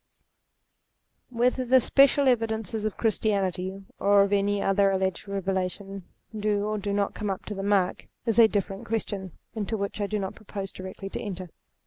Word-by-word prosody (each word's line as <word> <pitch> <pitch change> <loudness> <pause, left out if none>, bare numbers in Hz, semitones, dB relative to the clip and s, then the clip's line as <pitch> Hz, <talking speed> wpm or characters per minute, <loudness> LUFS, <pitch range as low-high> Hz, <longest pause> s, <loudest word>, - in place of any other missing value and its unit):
Whether 250 +1 +1
the 255 +1 +5
special 275 +2 +4
evidences 220 -3 0
of 215 - -2
Christianity, 195 -3 0
or 200 0 +5
of 200 +1 0
any 205 0 +2
other 195 0 +3
alleged 190 0 -1
revelation, 195 0 -3 0.3
do 210 -1 0
or 215 0 -1
do 200 0 -3
not 200 0 0
come 210 -2 -3
up 190 - -4
to 210 - -4
the 195 - -4
mark, 195 -2 +1 0.2
is 230 0 +2
a 225 - +9
different 200 -2 -3
question, 200 -5 -3 0.2
into 220 0 -2
which 200 +1 -3
I 205 - 0
do 215 - -1
not 190 -2 -3
propose 200 -3 -6
directly 190 +1 -7
to - - -4
enter. 185 -3 -5
200 Hz, 170 wpm, -27 LUFS, 195-215 Hz, 0.3 s, a